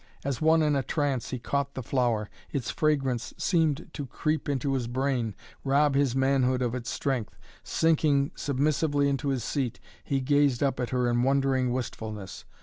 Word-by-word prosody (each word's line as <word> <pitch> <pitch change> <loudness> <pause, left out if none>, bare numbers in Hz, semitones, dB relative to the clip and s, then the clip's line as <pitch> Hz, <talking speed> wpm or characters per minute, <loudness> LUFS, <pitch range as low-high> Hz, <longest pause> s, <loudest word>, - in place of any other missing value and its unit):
As 140 -1 -2
one 160 0 +4
in 150 -1 +2
a 140 - +2
trance 140 -2 -1
he 130 - -3
caught 140 +3 -2
the 130 - -4
flower. 120 -4 0 0.2
Its 135 -4 -2
fragrance 135 -6 0
seemed 160 -4 +1
to 145 -3 -5
creep 155 +3 -1
into 140 0 0
his 125 -3 -1
brain, 125 -4 -1 0.3
rob 140 +1 +3
his 135 -2 +2
manhood 130 -1 +2
of 120 -1 -1
its 125 -2 -4
strength. 130 -6 -2 0.2
Sinking 150 -3 +2
submissively 145 +1 +1
into 140 +1 -1
his 130 -3 -1
seat 135 -6 -2 0.2
he 135 - 0
gazed 140 -1 +2
up 135 -2 0
at 125 - -1
her 125 -1 +1
in 120 0 +2
wondering 135 -1 +2
wistfulness. 110 -5 -5
135 Hz, 170 wpm, -28 LUFS, 125-145 Hz, 0.3 s, one